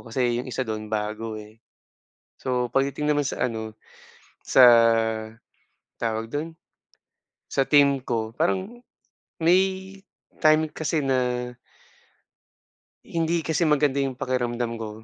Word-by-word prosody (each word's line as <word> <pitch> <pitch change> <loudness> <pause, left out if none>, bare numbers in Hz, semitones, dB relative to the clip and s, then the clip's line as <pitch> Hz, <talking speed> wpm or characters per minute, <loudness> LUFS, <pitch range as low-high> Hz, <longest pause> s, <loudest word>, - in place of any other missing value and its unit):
kasi 120 0 0
yung 125 - -8
isa 130 +1 -2
dun, 110 -2 -5
bago 110 +1 -3
eh. 110 +1 -12 0.8
So 125 -1 -1
pagdating 140 +2 +1
naman 145 0 0
sa - - -2
ano, 110 -2 -4 0.7
sa 130 - +5 1.4
tawag 115 0 -3
dun, 160 +3 -4 0.9
sa 135 - +1
team 140 -1 +4
ko, 110 -2 -2
parang 195 +9 -2 0.5
may 190 +3 +1 0.5
time 155 0 +5
kasi 160 0 -2
na 125 -2 -1 1.5
hindi 165 0 -1
kasi 160 +2 0
maganda 145 -3 +2
yung 135 -2 -3
pakiramdam 120 -3 -2
ko. 110 -1 -6
130 Hz, 110 wpm, -24 LUFS, 115-155 Hz, 1.5 s, sa